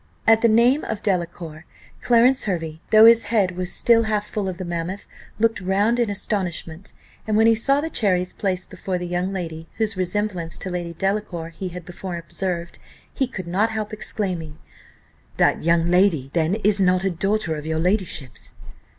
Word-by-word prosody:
At 225 0 +5
the 235 - +4
name 240 +6 +4
of 220 -1 -4
Delacour, 170 -5 -2 0.4
Clarence 245 +2 +4
Hervey, 165 -5 -3
though 220 0 +8
his 230 0 +7
head 205 -4 +1
was 180 0 -4
still 230 -1 +3
half 210 -1 0
full 205 -3 -3
of 180 - -6
the 185 - -5
mammoth, 175 +3 -4 0.3
looked 225 -1 +1
round 200 +6 +1
in 235 -3 +1
astonishment; 190 -3 -4 0.4
and 215 -1 +1
when 220 - +5
he 225 - +6
saw 275 +5 +2
the 320 - -3
cherries 180 -7 0
placed 185 -2 -3
before 185 -2 -3
the 180 - -5
young 180 +2 -2
lady, 165 -4 -5
whose 220 -1 0
resemblance 185 -2 -2
to 185 - -5
Lady 175 -1 -4
Delacour 195 -4 -2
he 170 +3 -6
had 180 -1 -8
before 180 0 -6
observed, 170 0 -4 0.3
he 265 - 0
could 190 -7 -7
not 195 +6 +1
help 215 -1 -4
exclaiming, 180 -8 -4 0.8
"That - - +2
young 170 +1 +2
lady 175 -8 +3
then 165 +2 +1
is 210 -1 +2
not 185 0 +3
a 195 - +1
daughter 195 -1 0
of 150 0 -7
your 160 0 -1
ladyship's?" 175 - -2
190 Hz, 180 wpm, -22 LUFS, 170-215 Hz, 0.8 s, though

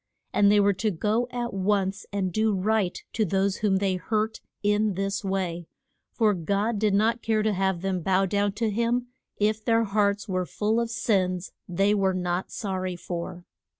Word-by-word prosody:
And 200 0 +5
they 210 - +5
were 200 0 +4
to 215 +3 0
go 210 +6 0
at 245 -1 -3
once 195 0 0
and 190 -3 -1
do 215 0 +2
right 200 -1 0
to 225 - +1
those 195 0 +1
whom 205 -3 +1
they 190 -1 0
hurt 215 +4 -1 0.2
in 210 -1 +2
this 195 +2 -2
way, 180 -4 -2 0.4
for 220 -3 +2
God 200 +5 -1
did 210 -2 +2
not 225 +3 +2
care 220 -1 +1
to 215 -1 +1
have 190 -2 0
them 190 -1 -1
bow 190 +3 +2
down 200 +1 0
to 220 +1 -1
him 235 +3 0 0.3
if 215 +1 +1
their 230 0 +3
hearts 200 -1 +1
were 185 -2 -1
full 220 +2 0
of 235 -1 -1
sins 185 -5 0 0.2
they 195 +4 +2
were 195 -2 +2
not 180 0 -2
sor 195 -5 -3
ry 185 -1 -3
for. 175 0 -6
200 Hz, 185 wpm, -26 LUFS, 190-215 Hz, 0.4 s, And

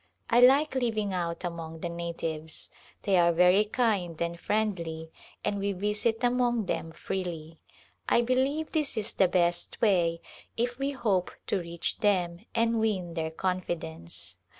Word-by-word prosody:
I 235 - +6
like 270 +5 +6
living 220 -6 0
out 170 -1 -2
among 165 -2 -5
the - - -2
natives. 165 -2 -4 0.3
They 195 -2 +3
are 170 -1 +5
very 180 +4 +5
kind 210 -7 0
and 170 0 -2
friendly 170 -7 -2 0.3
and 205 - 0
we 200 0 0
visit 210 +4 0
among 240 -2 +2
them 165 -2 -2
freely. 165 -3 -5 0.5
I 235 - +4
believe 265 +6 +1
this 305 -7 0
is 210 - -1
the 190 - +4
best 175 -1 +1
way 175 -6 +3 0.4
if 240 +2 -1
we 275 +1 0
hope 215 -10 0 0.2
to 195 - 0
reach 170 -1 -3
them 180 -5 +1 0.2
and 230 0 +2
win 190 -6 0
their 160 -1 -2
confidence. 160 - -4
185 Hz, 150 wpm, -29 LUFS, 170-230 Hz, 0.5 s, I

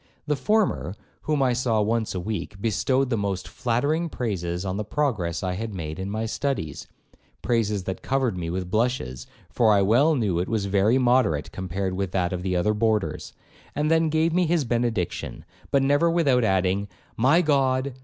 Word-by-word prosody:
The 150 0 +1
former, 205 - 0 0.3
whom 150 -3 0
I 125 -2 +2
saw 120 -3 +1
once 110 0 0
a - - -1
week, 100 +1 -5
bestowed 130 +5 0
the 115 - +1
most 100 -2 -2
flattering 145 +8 -1
praises 90 - -3
on 95 0 -2
the 105 - -2
progress 105 - -1
I 90 -1 -1
had 110 +2 -5
made 80 -1 -5
in 95 +1 -4
my 110 +2 -2
studies, 115 - -3 0.6
(praises 105 -5 0
that 95 0 -5
covered 130 -6 0
me 85 -2 -4
with 90 +1 -4
blushes, 110 - -1 0.2
for 115 -3 +3
I 100 -1 +4
well 135 +11 +4
knew 100 -9 0
it 90 - -2
was 110 -3 0
very 100 +5 +3
moderate 120 - +2
compared 95 +1 -3
with 95 -1 -3
that 90 -1 0
of 90 - -3
the 90 0 -1
other 105 +5 +2
boarders), 110 -1 -1 0.4
and 150 +2 0
then 160 0 +3
gave 160 +1 +1
me 180 -1 +2
his 165 -3 +1
benediction, 115 -6 -2 0.2
but 140 -1 +2
never 145 +5 +3
without 145 -8 +2
adding, 95 0 +1 0.3
'My 140 +10 +4
God! 135 -3 +1
110 Hz, 185 wpm, -25 LUFS, 95-135 Hz, 0.6 s, I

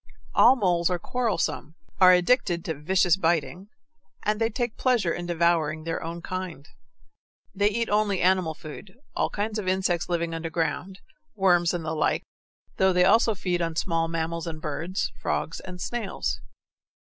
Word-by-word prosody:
All 260 - +7
moles 180 -7 +1
are 180 - 0
quarrelsome, 195 - -2 0.2
are 185 -1 +8
addicted 180 -2 +2
to 160 - -1
vicious 180 +3 +2
biting, 175 +2 0 0.6
and 210 +1 0
they 225 - +3
take 240 0 -3
pleasure 240 -10 +1
in 175 0 -5
devouring 165 -2 +1
their 165 0 -3
own 170 +1 -6
kind. 185 -6 -5 0.9
They 205 +1 +2
eat 230 +2 -1
only 205 -2 +1
animal 180 -3 +2
food, 160 +6 -10 0.2
all - - +1
kinds 215 +1 -2
of 195 - -5
insects 185 -2 0
living 170 -1 -1
under 165 0 -4
ground, 165 +4 -3 0.3
worms, 175 -4 +3
and 175 -3 -4
the 160 - -2
like, 155 - 0 0.5
though 190 -1 +3
they 180 0 +4
also 225 +1 +4
feed 180 -2 -1
on 165 -1 -2
small 165 -1 0
mammals 165 +1 -3
and 160 -1 -5
birds, 160 +5 -3
frogs, 165 - -2
and 180 -1 -9
snails. 195 - -3
175 Hz, 160 wpm, -26 LUFS, 165-195 Hz, 0.9 s, are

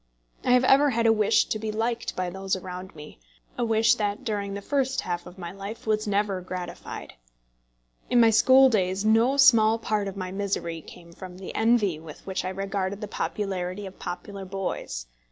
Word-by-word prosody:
I 250 - +3
have 250 0 +5
ever 275 +3 +5
had 230 -2 0
a 225 - +6
wish 215 -2 +3
to 215 - -3
be 215 0 -3
liked 230 +2 -2
by 180 -1 -2
those 190 +1 -2
around 185 0 -8
me, 150 - -12 0.4
a 245 - -1
wish 225 -1 +4
that 205 -1 -2
during 200 -2 -3
the 200 - -5
first 265 0 0
half 175 -1 -4
of 180 - -12
my 170 -2 -6
life 200 +4 -8
was 215 0 0
never 200 -2 0
gratified. 180 -1 -7 1.0
In 245 - +4
my 230 -1 +6
school 260 +5 +6
days 195 -4 0
no 230 +5 +4
small 230 -5 +6
part 215 -2 -1
of 195 0 -6
my 185 -1 -4
misery 190 -4 -3
came 170 +2 -14
from 180 0 -10
the 190 - -8
envy 220 -7 +2
with 155 -1 -12
which 190 -1 -3
I 185 - -2
regarded 195 0 -3
the 210 - -5
popularity 195 -2 -3
of 190 0 -10
popular 195 +2 -6
boys. 185 - -4
200 Hz, 190 wpm, -26 LUFS, 185-225 Hz, 1.0 s, a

